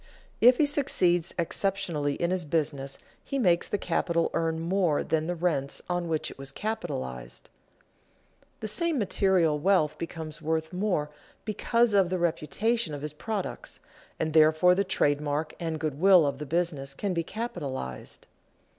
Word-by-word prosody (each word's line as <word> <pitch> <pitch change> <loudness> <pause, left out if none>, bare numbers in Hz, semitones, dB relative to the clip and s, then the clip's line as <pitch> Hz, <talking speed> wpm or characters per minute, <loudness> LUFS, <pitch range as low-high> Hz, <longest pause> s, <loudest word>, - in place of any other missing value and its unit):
If 245 +2 +7
he 305 - +4
succeeds 185 - +2
exceptionally 170 -4 -1
in 170 +1 -1
his 185 -1 0
business, 145 -3 -1 0.3
he 275 - -3
makes 175 -9 +3
the 205 - -1
capital 170 -3 0
earn 165 -1 0
more 170 -2 +1
than 160 0 0
the 175 - -1
rents 160 -6 -1
on 175 -1 -1
which 160 -2 -2
it - - -14
was 135 0 -4
capitalized. 65 - -5 1.1
The 215 - -3
same 335 - 0
material 185 - +2
wealth 155 -4 +2
becomes 160 -2 -6
worth 160 +1 -2
more 180 -6 -1 0.3
because 230 +1 +1
of 195 -3 +4
the 185 - 0
reputation 175 +3 0
of 145 - -8
his 150 -1 -4
products, 205 +5 -5 0.4
and 155 -1 -1
therefore 160 +3 +5
the 195 +2 +2
trade 145 -6 +1
mark 150 +1 -2
and 160 -2 -3
good 150 -2 -3
will 185 -3 +6
of 140 -1 -2
the 150 - -6
business 150 -4 -1
can 200 +3 -2
be 170 - 0
capitalized. 140 - -5
165 Hz, 155 wpm, -28 LUFS, 150-195 Hz, 1.1 s, If